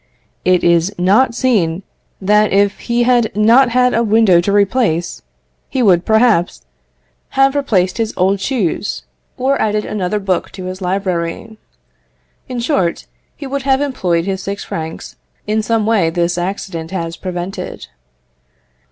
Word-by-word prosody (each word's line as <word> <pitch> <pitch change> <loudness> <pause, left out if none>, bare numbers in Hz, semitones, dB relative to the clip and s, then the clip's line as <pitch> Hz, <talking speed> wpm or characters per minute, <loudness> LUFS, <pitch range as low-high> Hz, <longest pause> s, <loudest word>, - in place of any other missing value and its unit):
It 180 -1 +2
is 170 +2 +3
not 205 +8 +3
seen 195 -10 0 0.4
that 210 +2 +2
if 200 +1 +2
he 240 0 0
had 240 -2 +2
not 235 +5 +5
had 250 +1 +2
a 230 - +2
window 215 -5 +4
to 200 - -1
replace, 200 -4 +1 0.5
he 260 - 0
would, 180 -5 +3
perhaps, 220 - +2 0.7
have 270 0 +4
replaced 210 -9 0
his 225 -1 0
old 190 +2 +2
shoes, 205 - -2 0.3
or 270 +2 0
added 210 -1 0
another 205 0 -2
book 195 -3 -1
to 185 -1 -8
his 185 +1 -6
library. 185 +3 -3 0.9
In 250 -1 -4
short, 235 - -1 0.3
he 285 - -8
would 275 +1 -3
have 265 0 +2
employed 185 -12 -1
his 190 -1 -3
six 200 +1 -5
francs 160 0 -7 0.3
in 215 +1 0
some 225 0 0
way 215 -6 +2
which 165 - -4
this 175 0 0
accident 175 -2 -4
has 170 -3 -4
prevented. 180 +1 -6
200 Hz, 145 wpm, -16 LUFS, 180-235 Hz, 0.9 s, not